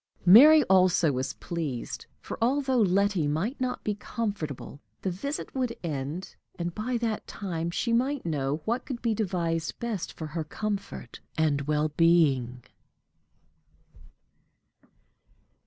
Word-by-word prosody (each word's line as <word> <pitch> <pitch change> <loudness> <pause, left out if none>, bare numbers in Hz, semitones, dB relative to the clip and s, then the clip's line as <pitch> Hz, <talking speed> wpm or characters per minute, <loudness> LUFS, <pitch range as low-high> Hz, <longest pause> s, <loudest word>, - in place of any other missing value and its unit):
Mary 290 - +9
also 185 - +4
was 130 +1 -2
pleased; 155 -8 -5
for, - - -6
although 260 0 +2
Letty 195 -4 +2
might 190 - -2
not 255 -1 -2
be 210 - 0
comfortable, 200 - -5 0.2
the 190 - 0
visit 280 - -5
would 250 -3 -1
end, 155 +3 -4 0.2
and 175 -1 -3
by 240 +5 -2
that 225 -2 -2
time 170 -4 -3
she 230 +7 -1
might 260 +2 +1
know 150 -1 -1
what 240 +3 0
could 250 -4 -6
be 230 -2 +2
devised 170 -6 -1
best 230 -6 -3
for 160 - -6
her 155 +1 -3
comfort 195 - -5 0.2
and 145 -3 +1
well 150 0 +1
being. 145 -7 +3
180 Hz, 125 wpm, -28 LUFS, 155-230 Hz, 0.2 s, Mary